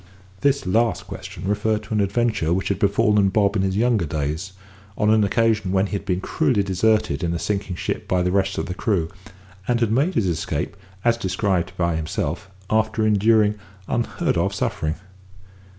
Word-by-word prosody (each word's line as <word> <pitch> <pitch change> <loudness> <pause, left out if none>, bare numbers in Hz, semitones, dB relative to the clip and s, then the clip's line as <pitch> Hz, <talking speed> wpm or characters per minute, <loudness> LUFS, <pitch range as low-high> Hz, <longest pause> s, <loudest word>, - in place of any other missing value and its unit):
This 140 +2 +1
last 110 +2 +1
question - - -7
referred 105 +1 0
to - - -6
an 105 - +2
adventure 100 -4 0
which 95 +2 -1
had 100 -2 -1
befallen 100 0 +3
Bob 100 +1 +2
in 100 - +2
his 95 0 0
younger 115 -6 +2
days, 75 +5 -3 0.4
on 105 0 +3
an 110 -1 +4
occasion 105 -2 +1
when 95 +1 +2
he - - -7
had 100 - -3
been 90 0 -1
cruelly 130 -4 +1
deserted 95 -5 +1
in 85 0 0
a - - 0
sinking 95 0 -2
ship - - -4
by 90 -1 +1
the 90 - +1
rest 100 0 +1
of - - -1
the 90 - -4
crew, 90 -4 -1 0.6
and 120 -1 +2
had 115 -3 +1
made 145 +11 +1
his 110 - +2
escape, 85 0 -2 0.3
as 115 -1 +4
described 95 -3 -1
by 85 -1 +1
himself, 80 +4 -3 0.2
after 110 +1 +1
enduring 105 0 +3 0.3
unheard 120 0 -1
of - - 0
suffering. 80 0 -1
100 Hz, 185 wpm, -22 LUFS, 90-110 Hz, 0.6 s, an